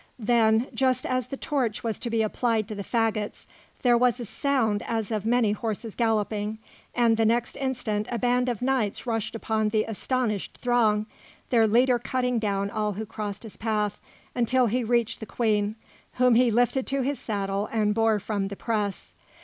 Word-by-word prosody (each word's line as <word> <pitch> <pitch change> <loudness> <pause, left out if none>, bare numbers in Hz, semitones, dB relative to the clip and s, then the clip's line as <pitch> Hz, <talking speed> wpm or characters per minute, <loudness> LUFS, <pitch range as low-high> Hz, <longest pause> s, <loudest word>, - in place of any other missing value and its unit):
Then, 225 -1 +3
just 255 +1 +1
as 255 -1 -1
the 275 - -6
torch 260 -9 -1
was 225 -2 -2
to 240 - -4
be 225 -1 +1
applied 220 -1 0
to - - -4
the 200 -1 -5
faggots, 220 -2 -1 0.4
there 245 -2 +5
was 245 0 +3
a 240 - -4
sound 225 -4 0
as 225 -1 -2
of 215 -1 -2
many 235 -3 +3
horses 220 0 -3
galloping, 215 -2 0 0.4
and 235 -2 +3
the 225 - +3
next 235 +2 +1
instant 230 -6 -2
a 240 - -2
band 250 +1 +1
of 240 -1 -3
knights 255 -6 0
rushed 225 -2 -2
upon 220 -1 0
the 215 0 +2
astonished 225 -1 -2
throng, 220 -4 +2 0.5
their 230 -3 +5
leader 245 +3 +4
cutting 250 -1 0
down 200 -2 -1
all 210 -1 -1
who 215 +3 -5
crossed 210 0 -5
his 220 - -10
path 210 -2 -1 0.3
until 250 +1 +2
he 235 +3 +1
had 235 -2 -4
reached 235 -2 +1
the 220 - -7
Queen, 210 -2 0 0.4
whom 250 -1 +4
he 245 +1 +5
lifted 245 +3 +1
to 275 -1 0
his 280 +2 -1
saddle 200 -1 -2
and 210 -2 +1
bore 225 -1 +2
from 200 -1 -2
the 200 - -6
press. 210 -2 -3
225 Hz, 185 wpm, -26 LUFS, 210-245 Hz, 0.5 s, there